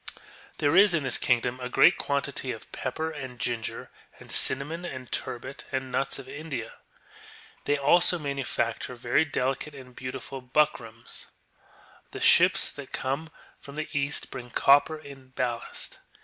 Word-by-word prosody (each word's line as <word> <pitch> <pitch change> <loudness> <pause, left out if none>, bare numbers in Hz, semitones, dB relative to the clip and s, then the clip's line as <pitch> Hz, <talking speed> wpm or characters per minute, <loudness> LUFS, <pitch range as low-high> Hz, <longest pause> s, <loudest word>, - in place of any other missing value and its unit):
^ - - -6 0.4
There 145 +2 +2
is 195 -1 +7
in 155 - 0
this 130 - +3
kingdom 125 0 +1
a 125 0 -4
great 170 - +6
quantity 140 -2 -2
of 110 - -9
pepper, 160 +5 -3
and 130 -5 -7
ginger, 115 -2 -3 0.3
and - - -10
cinnamon, 155 +6 +4
and 130 -7 -7
turbit, 130 +3 -4
and 130 - -1
of 130 - -11
nuts 135 +2 -1
of 135 -2 -10
India."* 140 -4 -6 0.9
They 145 - +2
also 175 +5 +4
manufacture 135 -5 -2
very 120 +5 +2
delicate 135 +1 -2
and 130 -2 -12
beautiful 130 +1 -6
buck 150 +4 +2
rams. 115 0 -6 0.9
The - - -5
ships - - +5
that 140 -2 -10
come 140 +5 -3 0.3
from 140 - -11
the 155 0 -4
east 140 0 0
bring 125 -2 -7
copper 145 +5 +4
in 135 -3 -13
ballast. 120 -2 -3
135 Hz, 155 wpm, -27 LUFS, 125-145 Hz, 0.9 s, is